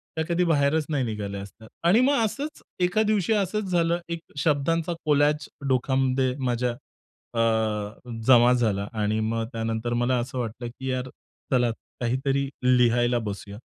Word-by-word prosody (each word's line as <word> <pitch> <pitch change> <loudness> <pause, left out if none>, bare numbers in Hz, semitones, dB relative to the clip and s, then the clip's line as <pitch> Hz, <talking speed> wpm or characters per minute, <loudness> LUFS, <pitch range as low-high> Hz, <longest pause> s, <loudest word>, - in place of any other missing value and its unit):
त्या 160 - 0
कधी 175 +1 +2
बाहेरच 150 -1 +2
नाही 140 -4 0
निघाल्या 100 -3 -4
असतात. 110 +3 -12 0.2
आणि 180 +7 +5
मग 270 -3 +3
असंच, 285 +8 -4 0.2
एका 180 +4 +2
दिवशी 215 -1 +1
असंच 205 -1 0
झालं 170 0 +2
एक 170 0 -3 0.2
शब्दांचा 160 +4 +1
कोलाज 150 0 +2 0.2
डोकामध्ये 130 0 +1
माझ्या, 125 0 0 0.6
अ 110 0 -1 0.2
जमा 120 -1 +7
झाला 105 -5 0
आणि 110 0 0
मग 115 +1 -1
त्यानंतर 115 +1 -2
मला 120 +1 +1
असं 130 +2 -4
वाटलं 120 +1 -4
की 130 +2 -6
यार 130 0 -2 0.4
चला 120 -2 +3 0.3
काहीतरी 135 +3 0 0.3
लिहायला 120 0 +3
बसूया. 100 -1 -6
130 Hz, 145 wpm, -25 LUFS, 115-160 Hz, 0.6 s, जमा